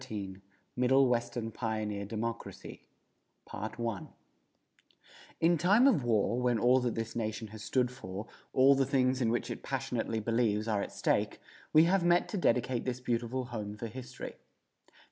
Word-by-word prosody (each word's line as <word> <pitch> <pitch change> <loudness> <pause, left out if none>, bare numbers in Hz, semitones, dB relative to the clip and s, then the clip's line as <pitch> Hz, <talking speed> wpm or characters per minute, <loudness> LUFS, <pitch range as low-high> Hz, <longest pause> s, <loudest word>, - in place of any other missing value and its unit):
XIII 100 -6 -6 0.3
MIDDLE 130 +2 +4
WESTERN 120 -1 -1
PIONEER 105 -3 -3
DEMOCRACY[335:1] 110 -1 -6 1.3
In 170 +1 +4
time 205 - +5
of 255 - +4
war, 115 +1 +1
when 125 -2 +2
all 125 +4 +4
that 125 -2 -1
this 115 0 -4
nation 110 -1 -3
has 110 0 -10
stood 125 -2 +1
for, 100 -5 -7 0.3
all 135 +1 +6
the 135 -1 +1
things 130 -1 +2
in 115 - +2
which 120 - -1
it - - -6
passionately 125 -4 -2
believes, 110 -1 0
are 105 -3 +1
at - - -5
stake, - - 0 0.3
we 155 - +7
have 180 +2 +3
met 175 0 +3
to 210 - -3
dedicate 125 -4 +1
this 125 -1 -3
beautiful 125 +1 -2
home 105 -2 -5
for 115 - -5
history. 125 +2 -8
120 Hz, 150 wpm, -31 LUFS, 110-130 Hz, 1.3 s, we